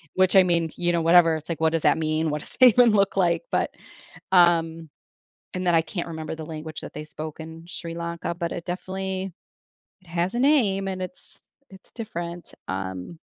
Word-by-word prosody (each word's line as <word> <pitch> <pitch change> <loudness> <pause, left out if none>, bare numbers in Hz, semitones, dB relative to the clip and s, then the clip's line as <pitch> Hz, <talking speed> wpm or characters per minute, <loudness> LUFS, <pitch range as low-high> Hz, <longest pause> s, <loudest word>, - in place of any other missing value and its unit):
Which 185 0 +3
I 190 - +9
mean, 170 -3 +1
you 175 0 0
know, 170 -1 +1
whatever, 165 -1 +6
it's 155 0 -7
like, 165 - -3
"What 160 0 +3
does 165 - 0
that - - +4
mean? 155 0 0
What 150 - -2
does - - -6
it 255 - +10
even 245 +1 +5
look 200 -2 +2
like?" 180 - +2
But, - - +1 0.6
um 165 -2 +3 0.7
and 185 0 -3
then 175 - +4
I 165 - +5
can't 170 +2 -5
remember 160 -1 -5
the 160 -1 -7
language 155 -1 -7
that - - -9
they 150 - -6
spoke 155 0 -8
in 160 +1 -9
Sri 170 -2 -7
Lanka, 170 0 -4
but 170 -1 -3
it 170 - -5
definitely 190 +1 -4 0.7
it 185 - -24
has 175 +2 -1
a - - 0
name, 225 -9 +3
and 185 -1 -4
it's 185 +9 -8 0.3
it's 190 -1 -16
different, 175 -6 -6
um 95 - -5
170 Hz, 205 wpm, -25 LUFS, 160-185 Hz, 0.7 s, it